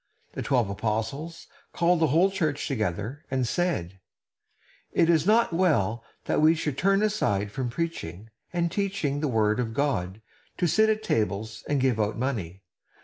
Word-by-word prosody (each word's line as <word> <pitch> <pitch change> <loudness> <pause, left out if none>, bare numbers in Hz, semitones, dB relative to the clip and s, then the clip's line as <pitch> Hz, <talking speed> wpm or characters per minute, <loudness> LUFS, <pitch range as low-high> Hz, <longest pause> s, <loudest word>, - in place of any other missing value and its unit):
The - - -4
twelve 125 -6 +1
apostles 110 +10 -3 0.3
called 175 0 +2
the 160 - +3
whole 170 +7 +3
church 155 -7 -1
together, 110 - -3
and 130 -2 0
said: 95 - -1 0.9
"It 165 - +4
is 160 +1 +2
not 220 -3 +4
well 120 - +1 0.2
that - - +1
we 160 +2 +6
should 150 -4 -2
turn 195 +5 +2
aside 105 - 0
from 125 +3 -3
preaching 110 - -5 0.2
and 170 -1 0
teaching 190 -9 -1
the 150 - 0
word 110 -3 +1
of 115 -2 -2
God 105 -9 -1 0.4
to 180 - +1
sit 220 +6 +4
at 215 0 0
tables 110 +1 -1
and 145 -1 +2
give 130 -4 +1
out 105 +1 0
money. 100 -8 -3
135 Hz, 160 wpm, -26 LUFS, 110-170 Hz, 0.9 s, we